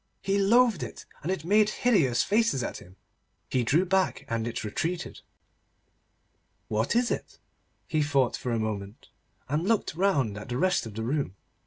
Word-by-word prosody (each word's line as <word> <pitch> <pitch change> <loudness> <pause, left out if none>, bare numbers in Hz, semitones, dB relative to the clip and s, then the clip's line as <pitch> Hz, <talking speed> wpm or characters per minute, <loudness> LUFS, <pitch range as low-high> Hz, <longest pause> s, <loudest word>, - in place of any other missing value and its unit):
He 195 +1 +1
loathed 225 -1 +4
it, - - -7 0.2
and 170 - -2
it 185 -5 -3
made 210 +3 +4
hideous 175 - +2
faces 215 - +2
at - - -4
him. 90 +1 -14 0.6
He 125 - +2
drew 155 +10 +3
back, 190 0 +1
and 115 0 -2
it 120 - -4
retreated. 165 +12 -3 1.5
What 110 - 0
is 240 0 +2
it? - - -4 0.5
He 155 -3 0
thought 140 -4 +2
for 125 - -4
a 115 - +1
moment, 105 -2 -4 0.4
and 150 +6 -1
looked 225 -7 +1
round 145 - +1
at 105 - -10
the 120 - -2
rest 180 -5 +1
of 105 - -10
the 110 - -3
room. 130 -5 -1
150 Hz, 170 wpm, -28 LUFS, -, 1.5 s, loathed